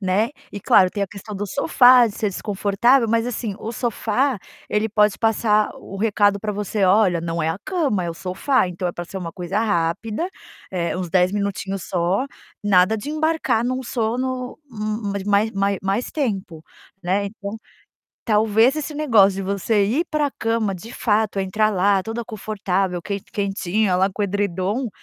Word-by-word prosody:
né, 200 +5 +1 0.2
e 205 - -6
claro, 185 0 +5
tem 205 - -3
a - - 0
questão 205 +2 -9
do 205 +1 -3
sofá, 250 - +5
de 205 - -9
ser 210 - 0
desconfortável, 210 +5 +2
mas 230 +1 +2
assim, 225 -4 -3
o 225 - -5
sofá 240 +3 0 0.3
ele 210 +1 0
pode 210 -1 +3
passar 215 -1 +2
o 195 - -10
recado 205 -1 +2
pra 210 -1 -2
você: 205 0 -1
"Olha, 185 -3 +4
não 165 0 -3
é 160 - +1
a 165 - -2
cama, 285 - 0
é 170 - -2
o - - -7
sofá, 185 +8 0
então, 180 0 -3
é - - -4
pra 175 - -6
ser 190 +2 -7
uma 170 -2 -6
coisa 180 +4 -2
rápida, 210 - -1 0.4
eh, 175 -1 -1
uns 185 -1 -3
10 180 +1 +3
minutinhos 195 -2 -3
só, 185 +8 0 0.4
nada 195 +1 +4
de 280 +8 -5
embarcar 310 -7 +1
num 255 +1 -1
sono, 250 +2 -2
hum 225 - -14 0.3
hum, 200 - -2
mais 200 - -3
mai 205 +2 +2
mai 195 0 0
mais 195 +5 -1
tempo", 195 - -3 0.4
né. 195 +3 0
Então, 200 +1 -7 0.7
talvez, 220 +5 +3
esse 305 0 -4
negócio 225 -10 +4
de 195 - -3
você 200 +2 +1
ir 270 - +1
pra 300 -2 0
cama, 225 -2 0
de 225 +7 -10
fato, 210 -3 +1
entrar 215 +3 +1
lá, 195 0 +2
toda 225 +1 -4
confortável, 195 -5 -2
quen 200 -1 -3
quentinha 200 -1 0
lá 190 +1 +3
com 210 - -3
edredom, 200 +4 -1
205 Hz, 180 wpm, -22 LUFS, 190-230 Hz, 0.7 s, claro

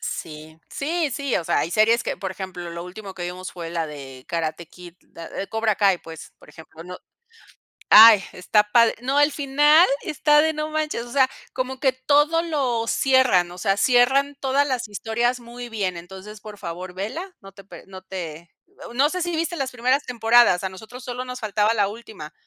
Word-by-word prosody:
Sí, 155 0 -7
sí, 315 +1 -2
sí, 275 0 -3
o 170 - -3
sea, - - +1
hay 165 - -2
series 225 +2 +3
que - - -3
por 190 - -5
ejemplo, 185 -2 -7
lo 170 +1 -7
último 190 +1 -10
que 175 - -6
vimos 180 +1 -6
fue 170 -2 -7
la 165 -2 -2
de 135 -3 -10
Karate 165 0 -3
Kid, 175 0 -14 0.2
eh, 170 +4 -7
Cobra 220 -1 0
Kai, 195 -4 +2
pues, 160 -1 -11
por - - -19
ejemplo, 160 0 -13
no 180 0 -8 0.9
Ay, 220 -3 +9
está 210 +4 +2
padre, 230 0 +4
no, 265 +3 -2
al 290 0 +4
final 295 +4 +4 0.2
está 295 0 +3
de 315 - +1
no 305 0 -4
manches. 305 -6 -2
O - - -12
sea, 265 -2 +4 0.3
como 260 0 -4
que 265 -2 +2
todo 295 +5 +2
lo 260 -8 -1
cierran, 260 -12 +3
o 175 - -11
sea, 195 0 0
cierran 265 +4 +3
todas 275 +2 +1
las 250 -4 -2
historias 235 +4 -2
muy 240 0 -10
bien, 195 -5 -2
entonces, 190 +4 -11
por 210 -2 -10
favor 180 0 -7
vela, 315 - -6
no 195 -1 -14
te 195 0 -15
pe 175 -3 -13
no 190 -1 -11
te 170 -3 -8 0.4
no 280 +4 +3
sé, 365 -1 -3
si 345 -1 -2
viste 335 +1 -2
las 270 -3 -3
primeras 255 +4 0
temporadas 230 -5 +3
a 190 - 0
nosotros 220 +7 -12
solo 250 0 -5
nos 250 0 -7
faltaba 210 0 +1
la 205 -2 +1
última. 205 -8 -10
220 Hz, 200 wpm, -22 LUFS, 180-265 Hz, 0.9 s, Ay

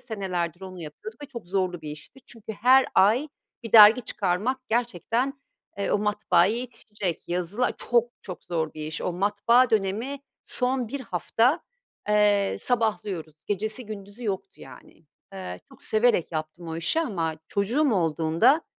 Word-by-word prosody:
Senelerdir 180 -5 -3
onu 185 -1 -9
yapıyorduk 215 - -10
ve - - -6
çok 235 -8 -9
zorlu 185 -2 -1
bir 155 -1 -7
işti 155 - -12
çünkü 225 -1 -8
her 255 +5 +5
ay 220 +10 +4 0.3
1 230 - -8
dergi 220 +2 +9
çıkarmak 205 +7 -1
gerçekten, 235 +3 0 0.4
eee, 200 - -1
o - - +2
matbaaya 210 -1 +2
yetişecek, 220 -7 -5
yazılar 180 +8 -1
Çok 240 0 +1
çok 185 -3 -8
zor 160 -3 -2
bir 155 -1 -5
iş. 155 - -5
O 180 - -1
matbaa 205 +7 +3
dönemi 220 +6 -1 0.2
son 250 -1 0
1 280 +4 -4
hafta, 235 - +1 0.5
eee, 205 -1 +3
sabahlıyoruz. 210 -9 -1
Gecesi 215 +4 -1
gündüzü 205 +2 -9
yoktu, 195 -3 -4
yani. - - -14 0.3
Eee, 90 -1 -7
çok - - -17
severek 220 -6 +2
yaptım 155 +2 -5
o 160 - -4
işi 170 - +1
ama 170 - -2
çocuğum 240 +8 +1
olduğunda 170 - +2
205 Hz, 145 wpm, -26 LUFS, 175-235 Hz, 0.5 s, dergi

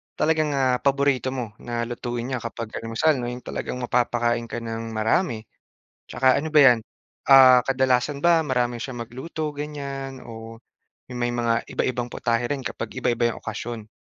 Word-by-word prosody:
talagang, 155 -2 +1
ah, 130 -2 +2
paborito 140 -2 +1
mo 120 -5 -4
na 120 -1 -4
lutuin 120 0 -4
niya 130 - -1
kapag 115 -1 -6
almusal, 115 +7 +1
'no. 120 - -3
'Yong 125 +1 -5
talagang 125 - -5
mapapakain 120 -1 0
ka 120 - -5
nang 115 0 -5
marami. 110 - +1 0.7
Tsaka 130 +1 +3
ano 155 +2 -3
ba 155 - +7
'yan, 125 -4 +7 0.5
ah, 130 -2 +8
kadalasan 130 +1 +1
ba 170 -1 +4
marami 125 -3 0
siyang 120 +1 -6
magluto 155 +5 -5
ganyan, 140 -3 -6
o 115 0 -10 0.5
may 120 -1 -2
mga 120 -1 0
iba-ibang 125 -1 -1
putahe 115 +1 0
rin 140 +2 -2
kapag 115 -2 -5
iba-iba 120 0 +1
'yong - - -11
okasyon? 110 0 -6
125 Hz, 160 wpm, -24 LUFS, 115-135 Hz, 0.7 s, ah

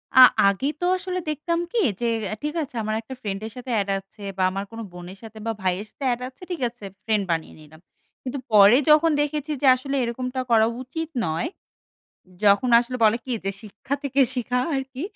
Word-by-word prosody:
আ - - +8 0.3
আগে 200 +7 +1
তো 355 - -1
আসলে 365 -1 -3
দেখতাম 335 +3 -1
কি? 475 - -2 0.2
যে 240 - -1 0.3
এ - - -3
ঠিক 300 +1 -2
আছে 255 - -11
আমার 215 0 -1
একটা 245 +4 -9
ফ্রেন্ডের 210 +2 -4
সাথে 250 0 -6
এড 200 - -5
আছে 195 +2 -19 0.2
বা, 185 - +1
আমার 195 +1 -3
কোনো 225 0 -7
বোনের 180 +2 -9
সাথে 220 0 -11
বা, 225 - 0
ভাইয়ের 185 +2 -1
সাথে 280 - -11
এড 245 - -6
আছে, 260 - -27
ঠিক 330 -6 -4
আছে, 230 -4 -13 0.2
ফ্রেন্ড 215 -2 +1
বানিয়ে 165 -1 -2
নিলাম। 155 +1 -16 0.4
কিন্তু 265 +1 -4
পরে 210 +3 +8
যখন 310 +2 +6
দেখেছি 295 0 -2
যে 275 - +3
আসলে 275 +2 -4
এরকমটা 250 +2 -3
করা 220 -1 +5
উচিত 320 +5 -5 0.2
নয় 160 +1 -1 1.0
যখন 205 +5 +5
আসলে 250 +1 -4
বলে 215 +1 +5
কি 255 - -4
যে 195 - 0
শিক্ষা 215 +6 -5
থেকে 275 0 +1 0.2
শিখা 250 +1 0 0.2
আরকি। 265 +1 -4
240 Hz, 200 wpm, -24 LUFS, 205-275 Hz, 1.0 s, আ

